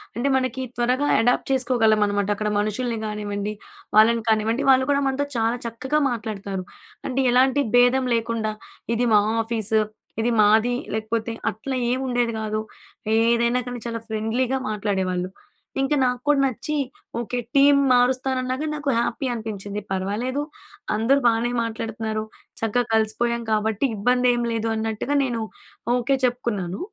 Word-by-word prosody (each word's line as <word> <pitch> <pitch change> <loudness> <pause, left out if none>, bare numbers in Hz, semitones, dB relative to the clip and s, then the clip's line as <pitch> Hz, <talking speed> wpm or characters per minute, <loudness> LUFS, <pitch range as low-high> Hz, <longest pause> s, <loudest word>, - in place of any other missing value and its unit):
అంటే 245 +4 -1
మనకి 255 0 -1
త్వరగా 250 +4 +1
అడాప్ట్ 245 +3 +1
చేసుకోగలం 240 -4 +3
అనమాట. 205 -1 0
అక్కడ 210 +1 -2
మనుషుల్ని 225 +3 -1
కానివ్వండి, 210 -1 -3 0.4
వాళ్ళని 225 +1 +5
కానివ్వండి. 220 +5 +1
వాళ్ళు 260 0 +5
కూడా 280 0 +2
మనతో 275 +2 0
చాలా 230 +2 +1
చక్కగా 260 +6 -1
మాట్లాడతారు. 200 -4 -4 0.4
అంటే 260 +1 -2
ఎలాంటి 265 +3 +4
భేదం 245 +1 +4
లేకుండా, 225 -1 -1 0.4
ఇది 240 +1 +1
మా 210 - +7 0.2
ఆఫీసు. 220 -1 0 0.4
ఇది 240 +1 +1
మాది 220 +4 +4 0.2
లేకపోతే, 220 +1 -2 0.2
అట్లా 260 +6 -5 0.2
ఏమి 260 +1 -1
ఉండేది 240 -2 0
కాదు. 215 0 -2 0.6
ఏదైనా 235 +1 +2
కానీ 245 -1 -5
చాలా 230 0 -3
ఫ్రెండ్లీగా 230 +4 0
మాట్లాడేవాళ్ళు. 190 -3 -1 0.5
ఇంక 270 +2 +1
నాకు 250 -1 0
కూడా 290 -1 +4
నచ్చి 265 +4 -3 0.4
ఓకె. 240 +1 -3 0.2
టీమ్ 280 0 +6
మారుస్తానన్నాగాని, 255 +3 +1
నాకు 295 -1 -3
హ్యాపీ 240 +3 -1
అనిపిచ్చింది. 210 -2 -5
పర్వాలేదు. 210 +9 -1 0.5
అందరూ 250 +6 +3
బానే 235 +1 +2
మాట్లాడుతున్నారు. 220 -1 -3 0.4
చక్కగా 225 +2 +1
కలిసిపోయాం 235 +2 +1
కాబట్టి 215 +3 +1
ఇబ్బంది 250 +4 +2
ఏమి 240 0 -1
లేదు 225 0 -1
అన్నట్టుగా 220 +6 -2
నేను 235 -3 -2 0.5
ఓకె. 250 +2 +1
చెప్పుకున్నాను. 210 -7 -2
235 Hz, 135 wpm, -23 LUFS, 215-255 Hz, 0.6 s, మా